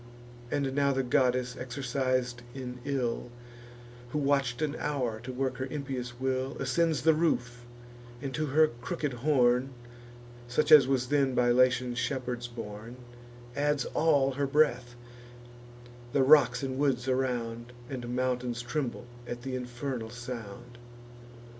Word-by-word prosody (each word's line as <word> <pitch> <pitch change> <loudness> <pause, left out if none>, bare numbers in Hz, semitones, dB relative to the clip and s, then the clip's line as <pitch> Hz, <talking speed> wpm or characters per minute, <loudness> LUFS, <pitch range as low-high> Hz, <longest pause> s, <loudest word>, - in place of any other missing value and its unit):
And 135 -1 -1
now 140 0 +2
the 135 0 0
goddess, 125 0 +2
exercis'd 130 -1 -2
in 125 -2 -6
ill, 130 -4 -1 0.8
Who 150 - -3
watch'd 140 -2 +1
an 150 0 -1
hour 125 -7 -2
to 120 +3 -7
work 130 0 -2
her 130 - -3
impious 130 -4 -5
will, 130 +1 -1
Ascends 155 +4 +1
the 160 0 +6
roof, 125 -7 -1 0.5
and 135 0 -5
to 155 +1 -1
her 155 +3 +5
crooked 125 +4 -4
horn, 125 -1 +2 0.7
Such 125 +5 +1
as 145 -4 +9
was 130 -2 0
then 140 -3 +2
by 120 0 +3
Latian 125 0 +3
shepherds 125 -1 -2
borne, 115 0 -8 0.6
Adds 145 -1 +1
all 145 -4 +3
her 140 +1 -1
breath: 125 -4 +2 1.2
the 140 - +4
rocks 135 -3 +5
and 130 0 -3
woods 135 -3 +1
around, 120 -3 -1 0.2
And 125 -2 -5
mountains, 125 -1 -1
tremble 120 -1 -3 0.2
at 120 0 -6
th' 130 0 -4
infernal 125 -1 -4
sound. 120 -1 -8
130 Hz, 135 wpm, -29 LUFS, 120-140 Hz, 1.2 s, as